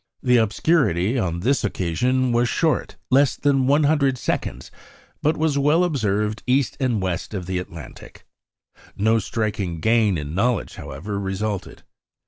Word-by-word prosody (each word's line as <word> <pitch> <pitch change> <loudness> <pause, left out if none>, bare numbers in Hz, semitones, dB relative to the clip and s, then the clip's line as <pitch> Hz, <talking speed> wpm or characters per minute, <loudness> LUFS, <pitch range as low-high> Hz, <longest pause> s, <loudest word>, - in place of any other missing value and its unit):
The 125 -1 +4
obscurity 110 - +2
on 85 -4 -2
this 135 +7 +1
occasion 125 +7 0
was 120 0 +2
short 160 -2 0 0.2
less 140 +1 +4
than 135 -2 +1
100 145 -2 +3
seconds - - -3 0.5
but 155 +2 +1
was 155 -2 +1
well 150 +5 +3
observed 105 - -1
east 130 0 +2
and 125 -5 +1
west 95 +2 -3
of 90 -3 -4
the 90 0 -2
Atlantic. 90 -4 -11 0.7
No 110 +3 +3
striking 100 -5 -3
gain 110 0 +2
in 75 0 -5
knowledge, 120 +7 0
however, 100 +9 -6
resulted. 95 0 -4
115 Hz, 135 wpm, -22 LUFS, 95-135 Hz, 0.7 s, The